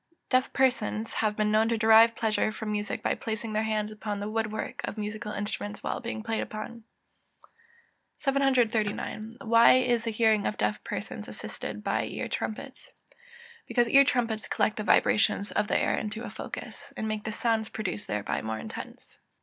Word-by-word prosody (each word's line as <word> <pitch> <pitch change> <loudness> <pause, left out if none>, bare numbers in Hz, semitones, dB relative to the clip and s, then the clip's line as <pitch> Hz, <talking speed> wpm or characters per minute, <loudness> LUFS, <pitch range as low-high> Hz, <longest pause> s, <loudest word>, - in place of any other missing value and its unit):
EZEKIEL 335 - -39
VII.] - - -51
Deaf 255 0 +2
persons 235 -4 +1
have 215 -1 0
been 210 0 +1
known 220 +1 +3
to 230 - +1
derive 225 +1 +7
pleasure 215 -1 +1
from 215 0 -5
music 210 -1 -2
by - - +2
placing 220 0 -4
their 215 - +1
hands 215 -1 -1
upon 210 -1 -4
the 205 - -3
wood 215 0 -1
work 215 - -4
of - - -4
musical 210 0 -4
instruments 205 0 -4
while - - -2
being 230 -2 -5
played 225 -1 -1
upon. 220 +1 -7 1.3
739. 235 -6 0
Why 230 +1 +6
is 245 -2 +3
the 230 - -1
hearing 220 -1 +3
of 210 - -3
deaf 105 0 -1
persons - - -5
assisted 105 0 -6
by - - 0
ear - - -4
trumpets? 270 - -5 0.7
Because 240 -1 +2
ear 275 +2 +8
trumpets 235 -6 0
collect 215 - +1
the 215 - -2
vibrations 205 -1 +3
of 210 - 0
the - - +2
air - - +1
into 215 +2 -4
a - - -6
focus, - - -8
and 220 - -2
make 215 -1 -2
the 220 - -3
sounds 220 0 0
produced 205 -1 -4
thereby 105 -1 -2
more 110 0 -3
intense. - - -9
220 Hz, 180 wpm, -28 LUFS, 210-230 Hz, 1.3 s, ear